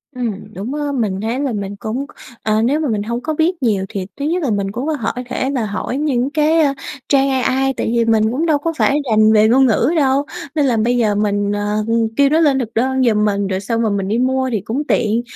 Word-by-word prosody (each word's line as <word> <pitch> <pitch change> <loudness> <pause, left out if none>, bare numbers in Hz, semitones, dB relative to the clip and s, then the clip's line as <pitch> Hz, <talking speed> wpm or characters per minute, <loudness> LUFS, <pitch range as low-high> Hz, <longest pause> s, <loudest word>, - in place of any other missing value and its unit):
Ừm, 215 -4 -5
đúng, 210 +9 -5
ơ, 295 -1 -2
mình 210 -8 -1
thấy 230 +4 -2
là 275 -4 -1
mình 200 -1 -4
cũng, 220 +7 -4 0.4
ờ, 215 0 +1
nếu 275 +6 +1
mà 305 -3 -1
mình 210 -2 -1
hông 235 +3 -3
có 315 +4 -2
biết 325 0 0
nhiều 200 -5 +1
thì 195 -2 -4
thứ 280 - -2
nhất 340 +3 0
là 270 - 0
mình 200 -1 -1
cũng 245 +8 -4
có 315 - 0
hỏi 225 - -2 0.2
thể 260 +1 -1
là 255 -5 -1
hỏi 210 +5 -3
những 270 -4 0
cái, 310 +2 +2
ơ, 280 -2 +2 0.4
trang 275 -1 +3
AI, 265 0 +1
tại - - -1
vì 235 -1 +2
mình 220 -1 +2
cũng 290 +7 -1
đâu 315 -3 +3
có 330 +3 -3
phải 285 - +2
rành 215 0 +5
về 215 0 +5
ngôn 265 +3 +5
ngữ 240 +3 +2
đâu, 275 0 +2 0.3
nên 295 -2 +2
là 245 -4 +1
bây 240 +3 +1
giờ 215 -3 +2
mình, 205 -1 0
ờ, 210 +1 -1 0.3
kêu 280 -1 +5
nó 310 +3 +3
lên 285 -5 +3
thực 230 -3 -4
đơn 260 +2 +1
giùm 215 -3 +2
mình, 200 -1 0
rồi 190 -1 -2
xong 230 +3 -2
rồi 220 -2 +1
mình 195 -1 -1
đi 215 +3 0
mua 260 +1 +1
thì 215 -5 -1
cũng 240 +8 -3
tiện. 225 +1 +1
240 Hz, 260 wpm, -18 LUFS, 215-275 Hz, 0.4 s, rành